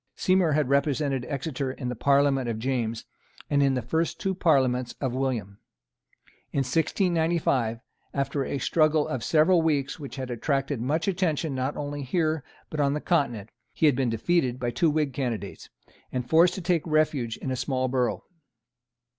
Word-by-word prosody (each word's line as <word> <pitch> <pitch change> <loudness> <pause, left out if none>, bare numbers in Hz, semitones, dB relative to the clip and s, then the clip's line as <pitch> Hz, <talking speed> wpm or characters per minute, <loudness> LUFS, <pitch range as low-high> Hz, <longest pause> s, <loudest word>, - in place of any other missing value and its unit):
Seymour 185 -4 +2
had 150 -2 +2
represented 140 -2 +1
Exeter 140 -2 -3
in 130 -1 -6
the 125 - -3
Parliament 140 0 +2
of 115 - -2
James, 115 -2 -2 0.5
and 140 -1 +3
in 135 -1 +3
the 125 - -1
two - - -19
first 170 +5 -1
Parliaments 130 -6 +2
of 130 -3 -2
William. 120 -7 -2 0.9
In 140 - +1
1695, 160 - +1 0.3
after 140 0 -1
a 140 - -3
struggle 155 +1 +2
of 130 -3 -3
several 165 +2 +4
weeks 145 -4 0
which 140 -3 -7
had 130 -2 -5
attracted 135 +1 -1
much 150 +8 -1
attention 170 -5 0
not 130 +2 -2
only 145 0 -4
here 155 +2 0 0.3
but 155 - -4
on 140 -1 +2
the - - -1
Continent, 120 - 0 0.2
he - - +2
had 145 -4 +5
been 130 -2 +1
defeated 125 +2 0
by 120 -1 -1
two 165 +5 +2
Whig 150 -3 0
candidates, 115 -7 -4 0.4
and 125 -1 -3
forced 170 +3 +5
to 190 - -5
take 175 -2 +1
refuge 155 -7 +1
in 130 - -4
a - - 0
small 130 0 -1
borough. 125 -1 0
140 Hz, 170 wpm, -26 LUFS, 125-155 Hz, 0.9 s, had